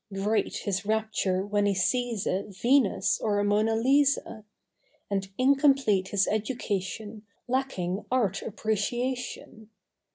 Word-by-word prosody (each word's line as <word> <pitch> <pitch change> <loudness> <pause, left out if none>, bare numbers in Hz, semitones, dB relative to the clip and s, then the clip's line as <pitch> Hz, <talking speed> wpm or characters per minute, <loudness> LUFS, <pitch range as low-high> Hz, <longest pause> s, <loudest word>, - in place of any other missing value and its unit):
Great 200 +3 -1
his 200 -1 -1
rapture 210 -3 0
when 205 0 +1
he 200 - +1
sees 230 +2 0
a 185 - 0
Venus 235 +3 +2
or 210 -2 0
a 205 - +1
Mona 210 +2 +2
Lisa; 265 -2 +2 0.7
And 195 -1 -1
incomplete 270 -7 +3
his 200 0 +1
education 215 -1 -3 0.3
Lacking 215 -8 -2
Art 225 -7 0
Appreciation. 225 +1 -3
215 Hz, 110 wpm, -27 LUFS, 200-245 Hz, 0.7 s, incomplete